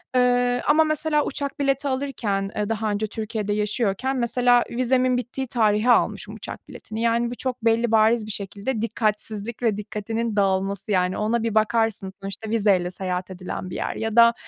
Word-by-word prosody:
Eee, 245 0 +3
ama 310 +2 +5
mesela 310 -1 +1
uçak 280 +1 -4
bileti 275 0 +1
alırken, 235 -8 -2
eee, 210 0 -1
daha 220 -1 -1
önce 205 +1 -1
Türkiye'de 215 -1 -3
yaşıyorken 210 +4 0
mesela 245 0 +3
vizemin 255 +1 +2
bittiği 255 +2 -4
tarihe 220 0 +2
almışım - - +1
uçak - - -9
biletini. 220 +1 -7
Yani, 235 +1 +1
bu - - -4
çok 250 -2 -4
belli 230 0 +3
bariz 220 0 +4
bir 215 - -5
şekilde 205 +4 -4
dikkatsizlik 215 0 -2
ve 215 -3 +2
dikkatinin 220 +2 -3
dağılması, 195 0 0
yani 185 -1 +1
ona 220 +2 0
bir 225 -2 -1
bakarsın 220 -2 +1
sonuçta 195 +3 -6
vizeyle 200 -5 +2
seyahat 185 0 -3
edilen 185 0 -6
bir - - -6
yer. - - -3
Ya 220 0 -3
da, 235 0 +7
225 Hz, 170 wpm, -24 LUFS, 205-245 Hz, -, da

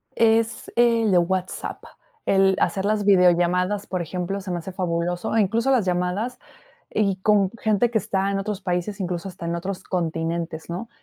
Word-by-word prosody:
Es 225 0 +2
el 230 -2 +3
de 180 - +5
WhatsApp, 185 +1 -2 0.4
el 195 0 +4
hacer 195 0 0
las 210 0 +1
videollamadas, 180 +1 +3
por 185 -2 -2
ejemplo, 180 +4 -3
se 190 -1 -6
me 175 - -1
hace 175 +3 -6
fabuloso, 175 0 -2
e, 225 - +5
incluso 230 +6 +1
las 245 -7 +3
llamadas, 180 +7 -1 0.5
y 200 -3 +1
con 195 -1 +3
gente 220 +2 +2
que 220 - +2
está 195 0 -1
en 195 - -1
otros 205 0 -4
países, 180 +3 -2
incluso, 180 0 -3
hasta 180 -2 -9
en 170 0 -1
otros 185 +2 -4
continentes, 165 -2 -3
¿no? 185 +7 -5
190 Hz, 175 wpm, -23 LUFS, 175-210 Hz, 0.5 s, de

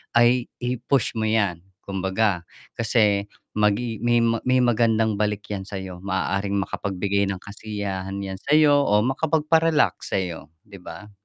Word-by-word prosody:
ay 120 +1 +4 0.2
i-push 125 +1 0
mo 110 - 0
'yan, 100 -6 +1 0.2
kumbaga. 95 -1 -1 0.2
Kasi 105 -3 +2 0.2
magi 105 +2 0
may 120 +1 +2 0.2
may 130 0 +4
magandang 110 -3 +2
balik 105 -1 -2
yan 95 -2 -3
sa - - -7
'yo, 95 -2 -8
maaaring 100 +1 -1
makapagbigay 100 +1 -1
ng 95 - -5
kasiyahan 100 -2 -5
'yan 95 -1 -6
sa'yo 145 +3 +4
o 105 -3 +3
makapagpa-relax 155 - +1
sa'yo, 90 -4 -3 0.2
'di 100 -3 -13
ba? 90 +4 -10
105 Hz, 135 wpm, -23 LUFS, 100-120 Hz, 0.2 s, ay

